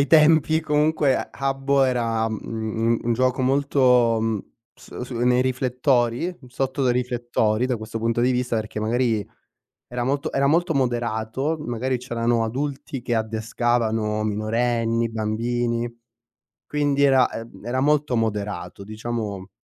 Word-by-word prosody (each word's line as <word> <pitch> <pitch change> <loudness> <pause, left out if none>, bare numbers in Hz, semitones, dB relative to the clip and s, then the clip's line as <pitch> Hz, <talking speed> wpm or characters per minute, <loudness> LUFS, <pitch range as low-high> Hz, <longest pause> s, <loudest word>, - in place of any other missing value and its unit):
ai 140 - +3
tempi 160 0 +5
comunque 150 -2 +2 0.2
Habbo 135 0 +1
era, 115 -3 +1
mhmm, 110 +1 -1
un 120 - +1
gioco 130 +2 +1
molto, 140 +2 +1 0.4
uhm, 110 -2 0 0.4
so - - -9
su 125 -1 -6
nei 125 +1 +3
riflettori, 130 +3 +1
sotto 130 +2 -2
dei 125 - +3
riflettori 120 -2 0
da 125 -1 0
questo 110 +1 -6
punto 115 +1 0
di 125 +2 +3
vista, 125 -1 0
perché 110 -1 -3
magari 110 -1 0 0.6
era 120 0 -3
molto 140 +2 -1
era 140 0 +2
molto 165 +3 +2
moderato, 120 +2 -1
magari 125 -1 -2
c'erano 120 -2 0
adulti 135 +2 -4
che 120 - -1
addescavano 110 -1 0
minorenni, 115 +2 0
bambini 115 +2 -1 0.7
quindi 145 -1 0
era, 135 -2 +5
ehm, 115 -2 -9
era 125 +2 -1
molto 145 -2 +2
moderato 105 -3 -3
diciamo 105 -3 -5
120 Hz, 130 wpm, -23 LUFS, 115-135 Hz, 0.7 s, tempi